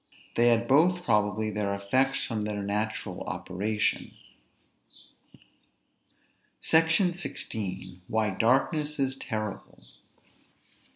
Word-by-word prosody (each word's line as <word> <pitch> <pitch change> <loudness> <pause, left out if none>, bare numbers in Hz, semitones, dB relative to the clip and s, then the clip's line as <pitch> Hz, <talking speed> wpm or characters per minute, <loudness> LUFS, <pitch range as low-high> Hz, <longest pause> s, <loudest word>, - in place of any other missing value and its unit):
They 120 +1 +4
had 120 0 +3
both 175 +7 +4
probably 105 - +1
their 100 -1 -1
effects 130 +7 +1
from 110 -2 -3
their 105 -1 -3
natural 105 +2 -3
operation. 105 +4 -2 2.5
SECTION 165 +3 +3
XVI. 95 - -5
WHY 110 -1 +1
DARKNESS 140 - +1
IS 135 -1 0
TERRIBLE. 110 -5 -5
110 Hz, 90 wpm, -28 LUFS, 105-135 Hz, 2.5 s, They